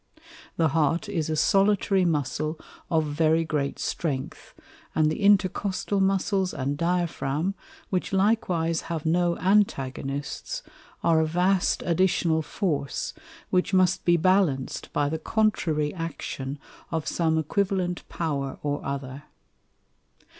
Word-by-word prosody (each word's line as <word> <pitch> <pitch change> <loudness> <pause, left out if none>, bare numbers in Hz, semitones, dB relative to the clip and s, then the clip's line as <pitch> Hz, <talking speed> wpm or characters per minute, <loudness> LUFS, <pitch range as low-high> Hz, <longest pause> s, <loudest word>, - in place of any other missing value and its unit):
The 160 -2 +3
Heart 165 +6 +1
is 165 -6 -1
a 155 - 0
Solitary 195 +3 +3
Muscle 155 0 -1 0.3
of 160 -2 +2
very 160 +2 +2
great 145 -3 -1
strength, 140 -6 -4 0.4
and 155 -1 +3
the 155 - -4
Intercostal 200 0 +2
Muscles 190 0 +1
and 140 0 -1
Diaphragm, 170 0 -1 0.4
which 185 -2 -1
likewise 185 -5 +1
have 165 -2 -3
no 170 +1 +2
Antagonists, 140 -8 -1 0.4
are 165 -1 +4
a 160 - +2
vast 180 +3 +1
additional 170 -2 +2
Force, 155 -4 -2 0.4
which 185 +2 +2
must 185 0 +3
be 175 0 +4
balanc'd 170 -7 +1
by 145 -1 +1
the 160 +2 -2
contrary 160 -9 +1
Action 150 -5 -5 0.3
of 160 -2 -2
some 160 -2 +1
equivalent 180 +2 0
Power 140 -5 -2
or 145 0 -2
other. 140 +1 -5
165 Hz, 120 wpm, -26 LUFS, 150-185 Hz, 0.4 s, are